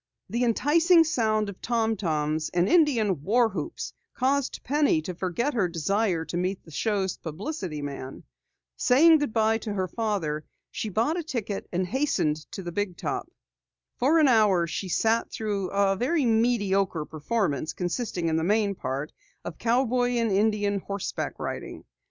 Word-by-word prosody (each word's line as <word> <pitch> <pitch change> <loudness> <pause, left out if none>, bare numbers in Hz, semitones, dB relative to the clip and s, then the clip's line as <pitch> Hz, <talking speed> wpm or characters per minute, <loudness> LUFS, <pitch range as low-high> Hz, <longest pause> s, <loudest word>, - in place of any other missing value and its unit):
The 235 +2 0
enticing 325 +8 +4
sound 220 -8 +1
of 200 -2 -8
tom 225 -2 0
toms 155 -4 -1
and 175 +1 +3
Indian 230 - +3
war 230 +8 +3
whoops - - -5 0.2
caused 270 +1 0
Penny 290 - +2
to 180 - -4
forget 190 - -1
her 205 -6 +1
desire 175 +1 0
to 160 +3 -4
meet 185 +2 -2
the 165 - -15
show's 195 +2 -1
publicity 170 - -5
man. 135 -2 -7 0.5
Saying 315 +5 +6
goodbye 225 -5 +1
to 215 - -5
her 190 -2 -1
father, 185 -9 -2 0.3
she 220 - -4
bought 235 - 0
a - - -3
ticket 230 - -4
and 185 +1 0
hastened 175 - 0
into 195 - -7
the 175 - -5
big 185 -1 -2
top. - - -3 0.7
For 285 +7 +3
an 310 -3 +5
hour 210 -8 +4
she 175 +3 -4
sat 225 +5 +1
through 205 -4 -2
a 200 -1 +2
very 270 - +1
mediocre 205 -7 +1
performance, 155 - -1
consisting 180 -1 -2
in 160 0 +1
the 160 - 0
main 205 +2 +2
part 140 -2 -4 0.3
of 160 - -7
cowboy 245 +1 +1
and 230 -3 +1
Indian 205 0 +1
horseback 200 0 -4
riding. - - -6
205 Hz, 155 wpm, -26 LUFS, 175-240 Hz, 0.7 s, Saying